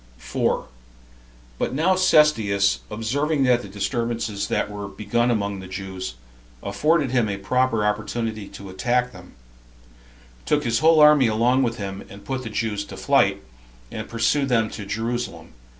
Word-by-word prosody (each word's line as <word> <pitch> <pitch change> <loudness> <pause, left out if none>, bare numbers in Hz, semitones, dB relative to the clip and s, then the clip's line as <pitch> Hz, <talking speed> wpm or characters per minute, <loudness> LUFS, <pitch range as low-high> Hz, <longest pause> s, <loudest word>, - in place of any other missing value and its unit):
4. - - -1 0.9
But - - -1
now 165 +6 +3
Cestius, 150 - +3
observing 135 +7 0
that 125 -2 +3
the 105 - -9
disturbances 115 +1 -2
that - - 0
were 105 -1 -6
begun 105 +5 -1
among 100 -4 -1
the 95 - -9
Jews 95 -7 -6 0.5
afforded 150 -4 +1
him 120 -4 +2
a 100 - -2
proper 115 +2 +1
opportunity 110 0 -2
to 100 -1 -10
attack 125 +5 0
them, 90 -5 -14 1.1
took 150 0 +1
his 115 -2 +1
whole 160 +1 +5
army 150 -4 +7
along 120 +4 +2
with 120 -2 -1
him, 100 -2 -5
and 100 0 -12
put 130 -1 -3
the 120 - -6
Jews 105 -2 -2
to - - -10
flight, - - +2 0.5
and - - -6
pursued 135 +4 +1
them 115 -3 +2
to 105 -3 -7
Jerusalem. 120 +3 -3
115 Hz, 150 wpm, -23 LUFS, 100-130 Hz, 1.1 s, army